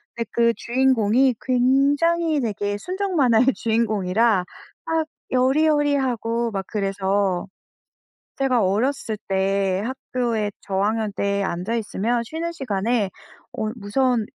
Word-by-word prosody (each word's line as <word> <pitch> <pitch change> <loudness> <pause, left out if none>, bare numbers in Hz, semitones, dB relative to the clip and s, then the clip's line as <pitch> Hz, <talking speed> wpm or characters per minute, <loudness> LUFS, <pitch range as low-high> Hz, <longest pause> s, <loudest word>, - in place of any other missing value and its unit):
근데 230 -2 -4
그 235 0 +4
주인공이 250 0 +2
굉장히 285 +5 +2
되게 205 -2 -2
순정만화의 305 - +2
주인공이라 220 -3 +1 0.4
막 325 -1 0 0.2
여리여리하고 260 -4 +1
막 195 -2 -3
그래서 195 -2 -1 0.9
제가 255 -4 +2
어렸을 220 +2 0
때 195 0 +1
학교에 235 -4 -2
저학년 205 +2 -1
때 200 0 0
앉아있으면 225 +5 -1
쉬는 330 +6 -4
시간에 220 - -1 0.4
어 220 - -3
무서운 235 +2 0
230 Hz, 250 characters per minute, -22 LUFS, 205-265 Hz, 0.9 s, 그